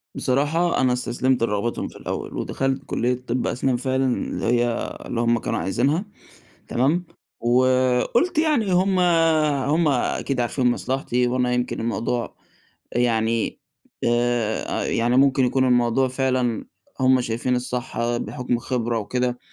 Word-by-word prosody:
بصراحة 155 +6 +1
أنا 130 -1 +3
استسلَمت 125 0 0
لرغبتهم 115 +1 -1
في - - -13
الأوَّل، - - -5
ودخَلت 135 0 -2
كلية 125 +1 0
طِب 120 +2 -1
أسنان 125 0 0
فعلًا، 130 +1 0
اللي - - -4
هي 120 +1 +2 0.4
اللي 115 - -2
هُم 120 0 +2
كانوا - - -2
عايزينها، 140 - 0 0.6
تمام؟ 150 +9 +1 0.3
وقُلت 130 - +2
يعني 300 -11 +2
هُم 185 +1 +2 0.7
هُم 160 +2 +2
أكيد 135 -1 0
عارفين 125 +1 +1
مصلَحتي، 125 0 -1
وأنا 125 0 0
يمكن 125 0 -1
الموضوع 115 +1 -2 0.6
يعني 115 -2 0 0.5
آآ، 120 -2 0
يعني 120 +2 +1
ممكن 135 -1 +4
يكون 130 +1 +2
الموضوع 125 +1 +3
فعلًا 130 -3 -1 0.4
هُم 130 0 +4
شايفين 120 +2 -1
الصح 120 -1 -2
بحُكم 125 +1 -4
الخِبرة 120 -1 -2
وكده، 125 +3 -2
125 Hz, 125 wpm, -23 LUFS, 120-130 Hz, 0.7 s, ممكن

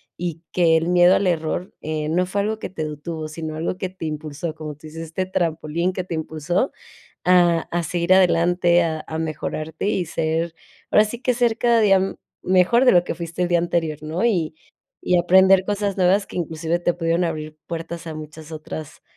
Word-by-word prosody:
y 170 -2 -4
que 165 -2 +4
el 165 +1 -1
miedo 180 +1 +5
al 195 - +1
error 170 +1 -1
eh, 155 -1 -3
no 175 +4 +1
fue 200 +2 -1
algo 215 +2 -2
que - - -5
te 155 -4 -4
detuvo, 155 +1 -5
sino 155 0 -6
algo 165 +3 -2
que 185 - -3
te 185 -3 -8
impulsó, 155 +1 -4
como 155 -1 -7
tú 155 +2 -13
dices: 160 +1 -8
"Este 165 +4 -3
trampolín" 170 -1 -1
que 185 -1 -4
te 180 - -5
impulsó 160 - -1 0.5
a 175 -2 +4
a 175 0 0
seguir 175 +3 +2
adelante, 175 -1 +4
a 160 -2 -2
a 160 - -5
mejorarte 160 +1 -4
y 190 -4 0
ser 160 +1 -1 0.4
ahora 210 - +6
sí 230 +3 -6
que 250 - +2
ser 235 -2 +2
cada 235 -1 +3
día, 195 -3 +5
mm, 190 - -2 0.3
mejor 185 +8 +4
de - - +7
lo 175 -1 +5
que - - -3
fuiste 170 +1 -4
el 175 - +1
día 175 -1 +3
anterior, 170 -3 -1
¿no? 160 +6 -2
Y 175 -9 +1 0.5
y 180 - +3
aprender 190 +2 +5
cosas 205 -1 -1
nuevas 190 +2 +3
que - - -10
inclusive 165 0 -1
te 175 0 0
pudieron 170 +1 0
abrir 155 -2 -4
puertas 170 0 -6
a 160 - -5
muchas 155 +1 -9
otras 155 -1 -8
170 Hz, 205 wpm, -22 LUFS, 160-185 Hz, 0.5 s, de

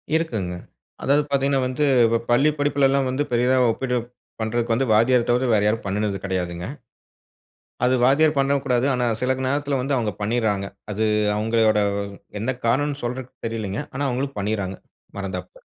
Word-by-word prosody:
இருக்குங்க. 110 - -1 0.5
அதாவது 145 +2 +3
பாத்தீங்கன்னா, 140 -1 +2
வந்து 140 +4 0 0.5
பள்ளி 135 +6 +5
படிப்புல 145 -1 +3
எல்லாம் 135 -1 +1
வந்து 135 +3 0
பெரியதா 125 +2 +3
ஒப்பீடு 125 +1 -1 0.4
பண்றதுக்கு 115 +1 0
வந்து, 130 +2 0
வாத்தியார 120 +2 +4
தவிர 125 +1 +2
வேற 105 -1 +3
யாரும் 110 -1 -1
பண்ணுனது 100 0 -1
கிடையாதுங்க. 90 -1 -3 1.2
அது 130 - +3
வாத்தியார் 150 +2 +4
பண்ணவும் 140 0 +1
கூடாது. 125 0 +2
ஆனா, 125 -1 0 0.2
சில 130 +1 0
நேரத்துல 140 0 0
வந்து 135 +1 0
அவங்க 110 -3 -1
பண்ணிருறாங்க. 105 -3 0 0.3
அது 110 +2 0 0.3
அவங்களோட 110 -1 +2 0.6
எந்த 130 +3 0
காரணம்னு 145 +4 +1
சொல்றதுக்கு 125 +1 -6
தெரியல்லங்க. 110 0 -3
ஆனா, 140 - -2
அவங்களும் 135 -1 -3
பண்ணிருறாங்க, 100 -2 -2 0.4
மறந்தாப்புல. 95 -2 -6
125 Hz, 145 wpm, -23 LUFS, 105-135 Hz, 1.2 s, பள்ளி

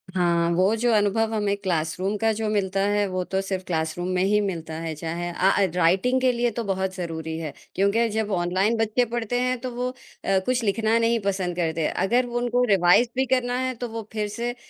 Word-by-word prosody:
हाँ, 170 -1 +2
वो 190 +5 +3
जो 240 +2 +1
अनुभव 215 +2 +2
हमें 205 -2 0
क्लासरूम 185 +2 -1
का 225 +1 +2
जो 220 0 -2
मिलता 195 -2 0
है, 205 0 +2
वो 185 -1 -2
तो 190 +1 -2
सिर्फ 190 -1 -3
क्लासरूम 160 +1 -2
में 180 - +2
ही 210 +2 +3
मिलता 165 -5 -4
है 165 -1 -4
चाहे 170 +3 -4
अ, 185 +3 +2
ए, 195 - +4
राइटिंग 190 +10 +2
के 255 -1 +4
लिए 240 0 0
तो - - -1
बहुत 190 -2 -2
ज़रूरी 160 -2 -4
है, 155 -3 -5 0.2
क्योंकि 200 +5 +2
जब 215 -1 -2
ऑनलाइन 185 +5 +1
बच्चे 225 +2 +1
पढ़ते 240 +1 -2
हैं 255 0 0
तो 255 -1 -4
वो 250 +1 -1
अ, 195 -6 -3
कुछ 250 -1 0
लिखना 220 +2 +2
नहीं 230 0 +2
पसंद 190 -3 -1
करते। 165 -2 0
अगर 245 +6 +1
वो 240 0 -4
उनको 245 +1 +1
रिवाइज़ 190 +6 +5
भी 265 - +2
करना 245 -1 -1
है 255 0 -2
तो 245 - -2
वो 225 -1 -6
फिर 210 -1 -1
से 235 +3 -4
205 Hz, 215 wpm, -24 LUFS, 180-235 Hz, 0.2 s, रिवाइज़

